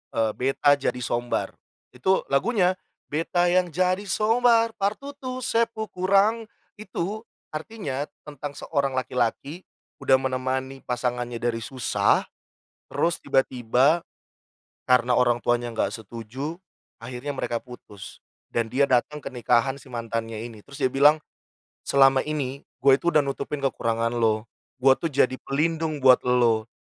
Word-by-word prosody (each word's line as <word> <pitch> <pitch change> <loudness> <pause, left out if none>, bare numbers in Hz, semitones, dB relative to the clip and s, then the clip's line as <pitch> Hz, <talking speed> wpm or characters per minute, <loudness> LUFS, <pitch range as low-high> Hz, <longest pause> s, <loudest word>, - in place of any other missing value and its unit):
Eee, 110 -1 +2
Beta 135 +2 +3
Jadi 125 -1 -2
Sombar. 120 +1 -1 0.4
Itu 190 +10 +1
lagunya 185 - +2 0.4
beta 165 +3 +1
yang 180 0 +2
jadi 185 +3 +1
sombar, 230 +1 +3
par 200 +2 -1
tutup 265 -3 -6
se 230 - +2
pung 220 -1 -5
kurang. 200 +5 +2 0.3
Itu, 205 +1 -4 0.3
artinya 155 -5 -4 0.2
tentang 145 -1 -7
seorang 140 -3 -1
laki-laki, 130 +6 -2 0.4
udah 130 -1 +5
menemani 130 +1 -2
pasangannya 120 -1 -2
dari 115 0 -2
susah, 130 +2 +1 0.7
terus 170 0 +1
tiba-tiba 135 +4 +2 0.9
karena 125 0 +4
orang 120 -1 +3
tuanya 120 0 0
enggak 115 - -1
setuju, 120 - -7 0.4
akhirnya 125 +4 -6
mereka 120 -2 -2
putus. 105 -6 -12 0.3
Dan 115 -1 0
dia 140 +1 +2
datang 145 +4 +1
ke - - -6
nikahan 125 +2 +1
sih 140 - -17
mantannya 115 -1 -4
ini. 115 -2 -8
Terus 140 0 -9
dia 130 - +3
bilang, 150 +3 +5 0.7
"Selama 135 -1 +5
ini 140 -3 -3 0.2
gue 135 -1 +7
itu, 170 - -5
udah 150 -3 +4
nutupin 140 +1 -4
kekurangan 115 -3 0
lo, 110 -2 +1 0.4
gue 135 -1 +8
tuh 165 - -1
jadi 130 -3 +2
pelindung 155 0 -1
buat 130 -1 +7
lo, 115 -3 +3
135 Hz, 135 wpm, -25 LUFS, 120-165 Hz, 0.9 s, gue